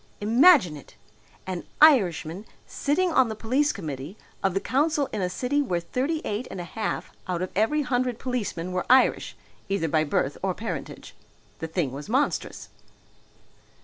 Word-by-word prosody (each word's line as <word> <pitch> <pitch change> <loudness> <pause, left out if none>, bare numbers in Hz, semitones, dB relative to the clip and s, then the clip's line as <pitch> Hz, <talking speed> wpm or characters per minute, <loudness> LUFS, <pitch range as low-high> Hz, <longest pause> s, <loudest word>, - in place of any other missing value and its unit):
Imagine 230 - +5
it! 140 - -15 0.5
An 185 -2 -4 0.2
Irishman 195 - +4 0.2
sitting 340 +5 0
on 260 -6 +4
the 220 - -4
police 260 +7 +1
committee 155 0 -7 0.2
of 195 -1 0
the - - +2
council 285 +4 +1
in 210 - -2
a 180 - 0
city 255 +10 0
where 180 -11 -1
thirty 265 - -2
eight 215 +5 -3
and - - -7
a - - -4
half 215 +5 -4 0.2
out 180 -1 -2
of 185 - -5
every 260 +10 +2
hundred 250 -2 -1
policemen 215 -9 -3
were 180 0 -2
Irish, 260 +1 +4 0.3
either 195 -4 0
by 155 0 +2
birth 145 -2 -1
or 185 -2 -1
parentage! 225 - -6 0.5
The 160 - -4
thing 160 -5 -1
was 145 +6 -8
monstrous. 265 +5 -1
215 Hz, 160 wpm, -25 LUFS, 175-260 Hz, 0.5 s, Imagine